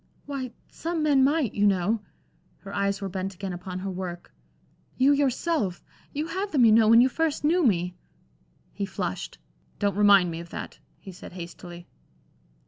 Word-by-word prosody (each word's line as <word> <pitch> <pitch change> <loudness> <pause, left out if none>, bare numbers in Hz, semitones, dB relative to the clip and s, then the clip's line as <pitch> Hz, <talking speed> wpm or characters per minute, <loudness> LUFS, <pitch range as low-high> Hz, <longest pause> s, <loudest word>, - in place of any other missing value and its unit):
"Why, 275 -3 -4 0.2
some 330 -1 -3
men 285 -3 +4
might, 285 -3 +2
you 205 0 +3
know." 200 +3 +1 0.6
Her 200 0 -9
eyes 200 0 0
were 195 - -2
bent 190 0 -4
again 190 0 -5
upon 180 +1 -6
her 190 +1 -4
work. 180 -1 -6 0.6
"You 270 +2 +5
yourself 280 - 0 0.3
you 295 +2 -2
had 385 +4 -3
them, 260 -6 +4
you 220 - +6
know, 220 0 +6
when 230 +2 +8
you 255 - +5
first 310 +3 -1
knew 335 +4 +3
me." 180 - +2 0.8
He 200 -1 -3
flushed. - - -4 0.4
"Don't 205 -1 +1
remind 200 -4 +5
me 165 - -5
of 170 0 -9
that," - - -7 0.2
he 190 - -11
said, 180 - -11
hastily. 175 0 -9
205 Hz, 170 wpm, -26 LUFS, 185-280 Hz, 0.8 s, when